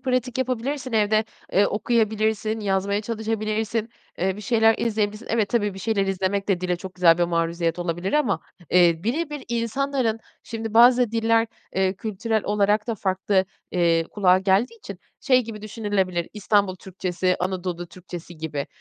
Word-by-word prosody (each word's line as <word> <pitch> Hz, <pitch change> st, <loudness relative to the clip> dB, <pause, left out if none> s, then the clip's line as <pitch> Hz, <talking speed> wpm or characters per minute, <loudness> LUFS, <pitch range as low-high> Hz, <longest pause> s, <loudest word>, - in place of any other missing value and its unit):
pratik 255 Hz, -1 st, -1 dB
yapabilirsin 255 Hz, +1 st, -2 dB
evde, 215 Hz, 0 st, +3 dB, 0.3 s
eee, 200 Hz, +2 st, +4 dB
okuyabilirsin, 220 Hz, 0 st, 0 dB
yazmaya 200 Hz, 0 st, 0 dB
çalışabilirsin, 220 Hz, 0 st, -2 dB, 0.3 s
eee, 190 Hz, +1 st, 0 dB
bir -, -, -8 dB
şeyler 225 Hz, +1 st, +3 dB
izleyebilirsin. 210 Hz, -1 st, -1 dB
Evet, 225 Hz, -3 st, +1 dB
tabii, 210 Hz, -3 st, 0 dB
bir -, -, -8 dB
şeyler 200 Hz, -1 st, 0 dB
izlemek 195 Hz, +1 st, -1 dB
de 190 Hz, -3 st, +1 dB
dile 180 Hz, -1 st, 0 dB
çok 185 Hz, +1 st, -9 dB
güzel 175 Hz, -2 st, +5 dB
bir 175 Hz, -, +3 dB
maruziyet 170 Hz, 0 st, -1 dB
olabilir 175 Hz, +2 st, -2 dB
ama, 275 Hz, -10 st, +2 dB, 0.3 s
eee, 175 Hz, -2 st, +5 dB
bire 300 Hz, +8 st, -1 dB
bir 295 Hz, -2 st, -6 dB
insanların 235 Hz, 0 st, -1 dB, 0.2 s
şimdi, 225 Hz, -1 st, -6 dB
bazı 240 Hz, 0 st, +6 dB
diller, 225 Hz, 0 st, +2 dB, 0.3 s
eee, 190 Hz, 0 st, +1 dB
kültürel 220 Hz, +2 st, -2 dB
olarak 210 Hz, +1 st, +2 dB
da 230 Hz, -, -1 dB
farklı, 190 Hz, -1 st, +1 dB, 0.3 s
eee, 170 Hz, -2 st, +2 dB
kulağa 185 Hz, -3 st, +4 dB
geldiği 195 Hz, -, +1 dB
için -, -, -9 dB, 0.2 s
şey 255 Hz, -3 st, +4 dB
gibi 215 Hz, -2 st, -8 dB
düşünülebilir; 200 Hz, -5 st, -1 dB
İstanbul 205 Hz, -2 st, +1 dB
Türkçesi, 185 Hz, -1 st, -2 dB
Anadolu 180 Hz, -1 st, -3 dB
Türkçesi 175 Hz, -1 st, -10 dB
gibi. 155 Hz, -3 st, -4 dB
210 Hz, 155 wpm, -24 LUFS, 185-225 Hz, 0.3 s, bazı